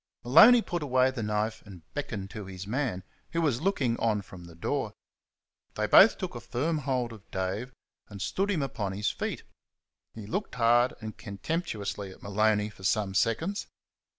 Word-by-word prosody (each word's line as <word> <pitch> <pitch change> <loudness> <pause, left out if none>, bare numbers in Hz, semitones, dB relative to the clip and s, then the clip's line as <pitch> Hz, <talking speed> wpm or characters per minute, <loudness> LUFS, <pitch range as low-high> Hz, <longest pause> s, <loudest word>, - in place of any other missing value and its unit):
Maloney 220 - +8
put 175 -2 -3
away 130 -2 +3
the 130 -3 -5
knife 105 +1 -1
and 95 -5 -12
beckoned 105 -9 -4
to 105 -2 -7
his 95 0 -7
man, 115 -4 -2 0.3
who 165 - +1
was 145 -7 +1
looking 140 -11 +1
on 105 -3 +1
from 90 -2 -12
the 85 -1 -13
door. 85 - -2 0.8
They - - 0
both - - +7
took - - -4
a - - -6
firm 155 +6 -1
hold 130 -4 -1
of 105 -3 -15
Dave 95 +7 -3 0.4
and 100 -2 -9
stood 195 - -1
him 170 -8 +1
upon 105 -7 -3
his 100 0 0
feet. - - -4 0.7
He 110 -2 -8
looked 195 - -3
hard 120 +1 +4
and 110 0 -6
contemptuously 105 - -4
at 95 - -14
Maloney 105 +1 +1
for 95 - -17
some 100 0 +1
seconds. 135 - 0
115 Hz, 175 wpm, -29 LUFS, 100-135 Hz, 0.8 s, Maloney